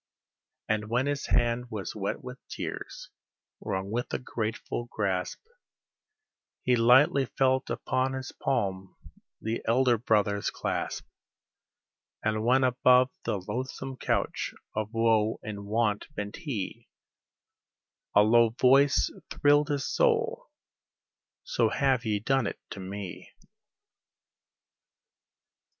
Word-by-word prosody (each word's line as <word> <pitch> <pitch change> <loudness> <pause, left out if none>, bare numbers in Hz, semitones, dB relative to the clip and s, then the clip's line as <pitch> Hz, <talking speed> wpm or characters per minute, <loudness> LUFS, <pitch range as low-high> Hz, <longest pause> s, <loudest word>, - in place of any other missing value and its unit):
And 110 0 -1
when 125 +3 +1
his 145 -1 -2
hand 120 0 +1
was 105 -5 -5
wet 100 -2 -3
with 125 0 -8
tears, - - -6 0.5
wrung 95 +1 -3
with 120 +2 -2
a - - 0
grateful 120 -1 -4
grasp, 95 -6 -2 1.2
He 125 - +3
lightly 130 +4 +5
felt 130 0 +1
upon 130 +1 -1
his 130 0 -5
palm 95 -7 -2 0.4
the 110 +1 -3
Elder 120 0 +3
Brother's 105 -3 +1
clasp; - - -3 1.2
And 110 0 0
when 130 +3 +4
above 125 0 +4
the - - 0
loathsome 130 +3 -4
couch - - -1 0.2
of 110 0 -2
woe 115 -1 +2
and 100 -1 -6
want 105 -1 0
bent 105 0 -5
he, 130 - -5 1.3
A 105 - +8
low 115 +1 +4
voice 140 +2 +5 0.2
thrilled 145 +1 +3
his 145 -2 -1
soul, 480 +1 +1 1.0
"So - - +1
have 130 -4 +1
ye 105 -2 0
done 130 +2 +1
it - - -4
unto - - -6
Me." 95 0 -7
120 Hz, 110 wpm, -28 LUFS, 105-130 Hz, 1.3 s, A